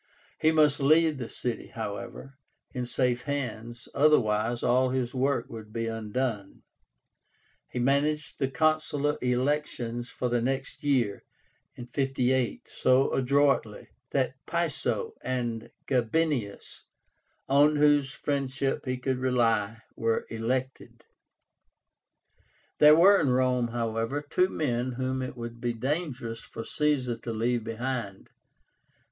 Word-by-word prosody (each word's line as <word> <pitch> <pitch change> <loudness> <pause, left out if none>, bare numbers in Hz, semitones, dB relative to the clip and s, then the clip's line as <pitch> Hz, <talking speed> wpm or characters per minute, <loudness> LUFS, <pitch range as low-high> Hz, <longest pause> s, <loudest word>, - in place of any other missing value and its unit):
He 160 - +4
must 150 -2 +4
leave 155 +1 +4
the 120 - -5
city, 120 -2 -3
however, 110 +5 -6 0.4
in 125 -1 -3
safe 125 -1 0
hands, 120 -4 -4
otherwise 115 -6 +2
all 125 +1 +3
his 125 -1 -1
work 130 -2 0
would 110 -2 -10
be 115 +1 -2
undone. 115 -1 -3 1.1
He - - -7
managed 140 +4 0
the 135 - +1
consular 155 0 +1
elections 125 -2 -1
for 125 - -3
the 120 -1 +1
next 135 +4 -3
year 125 -8 +1 0.5
(58) 130 0 -1
so 130 +1 +2
adroitly, 135 -4 +1 0.2
that - - -1
Piso - - -1
and 120 -3 -3 0.2
Gabinius, 125 -3 -1 0.6
on 145 +2 +5
whose 145 -2 +3
friendship 135 -2 -2
he 130 0 -1
could 130 0 -2
rely, 115 -4 +1
were 115 0 0
elected. 125 +4 -3 1.7
There 150 0 +8
were 195 +4 +7
in 140 - +2
Rome, 125 -1 +2
however, 115 +4 -2
two 185 +5 +2
men 125 -6 -1
whom 130 +1 -2
it 130 0 -5
would 115 0 -7
be 120 -1 -1
dangerous 130 -2 -3
for 115 - -8
Caesar 140 -6 0
to 120 - -6
leave 115 +1 0
behind. 115 -3 -4
130 Hz, 115 wpm, -28 LUFS, 115-140 Hz, 1.7 s, There